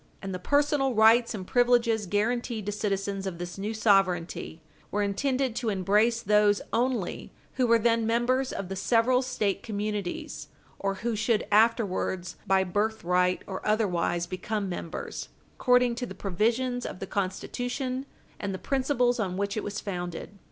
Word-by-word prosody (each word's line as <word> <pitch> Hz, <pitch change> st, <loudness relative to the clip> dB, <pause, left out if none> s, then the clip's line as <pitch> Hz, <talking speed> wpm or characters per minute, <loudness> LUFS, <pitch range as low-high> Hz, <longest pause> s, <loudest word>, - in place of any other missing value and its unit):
And 195 Hz, -1 st, -5 dB
the 185 Hz, -, -4 dB
personal 285 Hz, +2 st, +2 dB
rights 225 Hz, +2 st, +5 dB
and 190 Hz, -3 st, -6 dB
privileges 235 Hz, -2 st, +2 dB
guarantied 220 Hz, +2 st, -1 dB
to 205 Hz, -, -1 dB
citizens 195 Hz, -1 st, -2 dB
of 180 Hz, -3 st, -4 dB
this 175 Hz, +2 st, -6 dB
new 205 Hz, +2 st, -2 dB
sovereignty 190 Hz, -6 st, +1 dB, 0.3 s
were 205 Hz, 0 st, 0 dB
intended 255 Hz, +4 st, 0 dB
to 235 Hz, -, -1 dB
embrace 210 Hz, +4 st, +2 dB
those 210 Hz, 0 st, +4 dB
only 235 Hz, -5 st, -1 dB, 0.2 s
who 255 Hz, -2 st, +1 dB
were 230 Hz, 0 st, +6 dB
then 230 Hz, 0 st, +2 dB
members 250 Hz, +3 st, +1 dB
of 195 Hz, -, -4 dB
the 195 Hz, -, -5 dB
several 240 Hz, +5 st, +3 dB
State 215 Hz, -7 st, -1 dB
communities, 205 Hz, -8 st, -4 dB, 0.3 s
or 195 Hz, 0 st, -1 dB
who 235 Hz, -2 st, +1 dB
should 220 Hz, +1 st, +1 dB
afterwards 205 Hz, -4 st, +2 dB
by 190 Hz, 0 st, +4 dB
birthright 180 Hz, -2 st, 0 dB
or 190 Hz, -1 st, -6 dB
otherwise 180 Hz, -5 st, +1 dB
become 200 Hz, +3 st, -3 dB
members 175 Hz, -2 st, -5 dB, 0.2 s
according 250 Hz, -1 st, +3 dB
to 245 Hz, +1 st, -4 dB
the 190 Hz, -, -8 dB
provisions 235 Hz, +7 st, 0 dB
of -, -, -5 dB
the 195 Hz, -, -5 dB
Constitution 245 Hz, +8 st, -3 dB, 0.3 s
and 195 Hz, -1 st, -3 dB
the -, -, -4 dB
principles 250 Hz, 0 st, +1 dB
on 185 Hz, -4 st, -1 dB
which 200 Hz, 0 st, -1 dB
it 215 Hz, -, -2 dB
was 205 Hz, 0 st, -4 dB
founded. 180 Hz, +1 st, -6 dB
210 Hz, 155 wpm, -28 LUFS, 195-240 Hz, 0.3 s, were